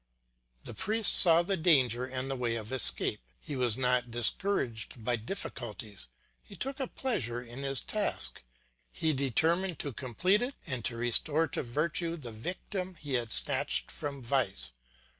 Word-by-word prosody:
The - - -9
priest 215 +3 +2
saw 170 -2 +10
the 195 +3 -1
danger 130 - +3
and 130 0 -4
the 135 - -3
way 120 -2 -1
of 110 0 -6
escape. 125 -4 0 0.2
He 150 - -7
was 125 -3 +1
not 125 -1 +1
discouraged 120 - -1
by 120 0 +2
difficulties, 110 - -6 0.3
he 65 - -14
took 270 +1 -2
a 265 - -2
pleasure 120 - -2
in 120 +2 -9
his 135 -2 -1
task; 210 - -2 0.5
he 155 - +1
determined 160 +6 +1
to 145 -2 -4
complete 170 - 0
it 255 +3 -3
and 130 - -4
to 115 - 0
restore 145 +7 +2
to - - -2
virtue 155 +6 -1
the 125 -7 -8
victim 180 - -6
he 145 -4 -6
had 120 -3 0
snatched - - +1
from 140 -3 -6
vice. 110 - -1
130 Hz, 160 wpm, -30 LUFS, 120-170 Hz, 0.5 s, saw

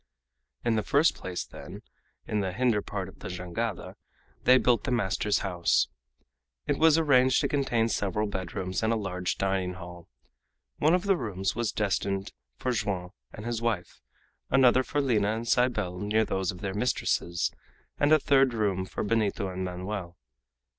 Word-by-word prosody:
In 115 -1 +2
the - - +2
first 145 +9 +3
place, 90 -1 -5
then, - - -10 0.4
in 105 - -1
the 95 -2 -2
hinder 115 -1 +2
part 100 -3 -4
of 95 - -14
the - - -7
jangada 90 +4 -4 0.5
they 130 - +7
built 125 -2 +2
the - - -2
master's 105 -3 +1
house. 90 -3 +2 0.8
It - - -1
was 160 -1 +6
arranged 130 -5 +4
to 140 - +1
contain 135 -6 +1
several 105 -1 -1
bedrooms 95 -1 -3
and 110 0 +1
a - - +2
large 90 -4 -2
dining 95 -2 0
hall. 90 -2 -10 0.7
One 155 +4 +4
of 180 - -1
the 200 -1 +3
rooms 100 - -2
was 115 -1 -1
destined 100 -2 -1 0.2
for 125 - -1
Joam 100 -6 -2 0.2
and 105 - -9
his 120 -1 -2
wife, 110 -6 -2 0.5
another 130 -1 +5
for 145 +3 -1
Lina 110 -5 +1
and 115 +1 -5
Cybele 110 -8 +1
near 110 +2 +1
those 95 -2 -1
of 90 - -11
their 95 -1 -3
mistresses, 95 -5 0 0.5
and 145 +1 +3
a 155 - +8
third 135 -4 +3
room 100 -4 0
for - - -4
Benito 105 -3 0
and 95 0 -4
Manoel. 90 0 -5
105 Hz, 165 wpm, -28 LUFS, 95-125 Hz, 0.8 s, a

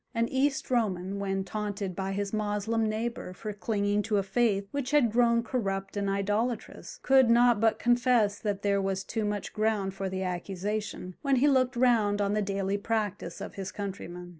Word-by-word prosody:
An 230 0 +2
East 270 0 0
Roman, 200 -5 0
when 195 -1 -1
taunted 200 -1 -4
by 190 +1 -3
his 200 +1 -3
Moslem 215 +1 0
neighbour 220 -3 -3
for 210 +3 -6
clinging 205 -1 0
to 210 0 0
a 200 - +1
faith 200 -1 +1
which 280 -3 -2
had 285 -6 +3
grown 235 0 +3
corrupt 195 -6 -2
and 200 -1 -1
idolatrous, 210 - -2
could 265 -2 +5
not 240 -1 +5
but 220 0 +3
confess 240 -4 +2
that 205 -2 -3
there 200 -1 +2
was 195 0 -1
too 220 +1 -2
much 205 -1 -3
ground 215 -3 0
for 195 0 -3
the 190 0 -3
accusation, 185 +2 -4
when 275 -1 +2
he 265 +3 +4
looked 260 -2 +3
round 230 -5 +3
on 200 0 +1
the 210 - +1
daily 195 0 -1
practice 210 -2 -2
of - - -6
his 190 -1 -5
countrymen. 180 -3 -6
210 Hz, 185 wpm, -29 LUFS, 195-235 Hz, -, could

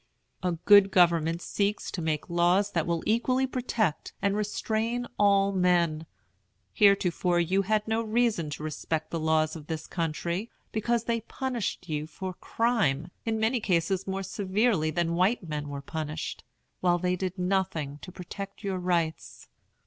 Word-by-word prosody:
A 180 -1 0
good 195 +4 +6
government 170 -2 +3
seeks 205 +1 -1
to 175 - -4
make 155 -2 -1
laws 175 +4 +2
that 165 -4 0
will 170 -1 -1
equally 255 +4 +2
protect 240 - -1
and 200 0 +1
restrain 220 +3 -1
all 200 -1 +4
men. 175 -4 +2 0.7
Heretofore 180 -3 +3
you 185 +3 +2
had 215 +2 0
no 220 +1 +1
reason 220 -7 +1
to 150 +1 -6
respect 155 +1 -3
the 165 - -2
laws 155 0 +1
of 155 -2 -9
this 160 -1 -4
country, 170 +5 -2 0.2
because 230 +1 0
they 230 -1 -1
punished 240 -6 -3
you 150 -1 -3
for 185 +4 -6
crime, 175 - 0
in 220 -1 0
many 225 +3 +2
cases 190 -1 0
more 195 0 -2
severely 195 -3 +1
than 170 +1 0
white 185 +2 +1
men 150 -1 -4
were 140 -1 -6
punished, 155 +1 -5 0.4
while 175 -1 +3
they 180 +1 0
did 185 +1 -3
nothing 180 -6 -1
to 180 - -9
protect 195 +3 -8
your 195 -2 -2
rights. 170 -3 -2
185 Hz, 155 wpm, -28 LUFS, 165-210 Hz, 0.7 s, good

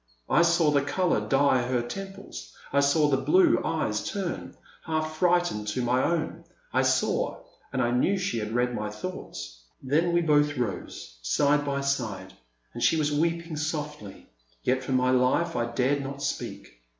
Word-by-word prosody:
I - - +5
saw 170 -2 +4
the 145 -1 +3
colour 180 +5 +1
dye 135 -2 +4
her 120 0 0
temples, 195 +8 -8 0.2
I 140 - +4
saw 140 +2 +3
the 140 -2 +2
blue 345 - +4
eyes - - -1
turn, 195 -4 -4 0.3
half 155 -1 -2
frightened 175 -12 +1
to 115 +4 -1
my 125 +1 +2
own, 170 -2 -1 0.3
I - - +3
saw - - 0
— - - -34
and - - 0
I 120 - +1
knew 125 +11 +2
she 185 -10 -1
had 105 0 -4
read 125 0 +1
my 105 -2 -3
thoughts. - - -7 0.2
Then 155 +6 +1
we 170 0 +3
both 150 -3 +2
rose, 100 - -5
side 145 - +2
by 140 -1 -1
side, 110 -9 -2 0.4
and - - -7
she 160 - +4
was 150 -1 +1
weeping 165 +1 -1
softly, 150 -8 -5 0.4
yet 130 +1 +1
for 130 - -2
my 130 0 +3
life 130 +7 +2
I 120 0 0
dared 130 +4 0
not 140 +1 -6
speak. - - -5
140 Hz, 175 wpm, -27 LUFS, 125-165 Hz, 0.4 s, I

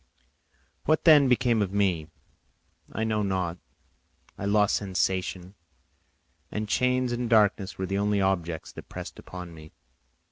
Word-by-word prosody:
What 155 +1 +2
then 150 -4 +7
became 125 -3 +2
of 95 -2 -1
me? 95 -6 +1 0.8
I 110 - -2
know 110 -1 0
not; 90 -3 -2 0.8
I 100 - -6
lost 105 0 +3
sensation, 95 -1 -2 1.0
and 105 0 -3
chains 125 +2 +1
and 120 -1 -2
darkness 105 -3 +3
were 95 - -2
the 100 +1 -1
only 105 0 +1
objects 85 -4 -1
that - - -11
pressed - - -8
upon 90 -2 -9
me. 80 -1 -13
100 Hz, 135 wpm, -27 LUFS, 95-110 Hz, 1.0 s, then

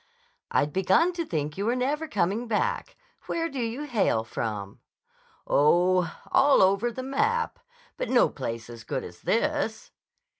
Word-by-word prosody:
"I'd 145 - +1
begun 190 - +3
to 340 -1 -2
think 150 +1 -3
you 205 - -1
were 240 - +2
never 290 +5 -1
coming 210 - 0
back. 475 - -1 0.3
Where 330 0 -1
do 275 -5 -6
you 235 +4 -2
hail 220 - +1
from?" 105 -3 -5 0.7
"Oh, 175 +3 +3 0.2
all 270 -4 +5
over 200 +5 +2
the 255 +3 -6
map. 450 - 0 0.4
But - - -3
no 250 - +5
place 115 -4 -5
as 115 -2 -10
good - - -3
as 90 0 -11
this." 290 -2 -1
225 Hz, 150 wpm, -27 LUFS, -, 0.7 s, all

